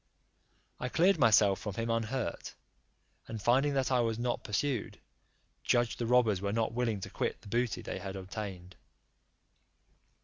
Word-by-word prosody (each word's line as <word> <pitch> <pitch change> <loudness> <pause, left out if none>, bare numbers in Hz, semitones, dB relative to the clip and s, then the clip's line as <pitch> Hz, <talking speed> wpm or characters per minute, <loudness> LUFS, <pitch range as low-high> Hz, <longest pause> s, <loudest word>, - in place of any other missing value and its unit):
I 125 - -3
cleared 180 +7 +3
myself 105 -5 +5
from 105 -3 -5
him 115 0 -1
unhurt, 115 -3 -2 0.7
and 115 - -5
finding 135 +6 +2
that 135 -1 +1
I 125 - +3
was 115 -2 0
not 120 0 -2
pursued, 120 +2 -2 0.7
judged 120 -1 +1
the 120 - -1
robbers 115 -6 +3
were 100 0 -1
not 115 +1 0
willing 115 -4 0
to - - -6
quit - - -2
the - - -14
booty 120 +2 -1
they - - -5
had 95 -1 -6
obtained. 95 -1 -7
115 Hz, 150 wpm, -31 LUFS, 100-125 Hz, 0.7 s, myself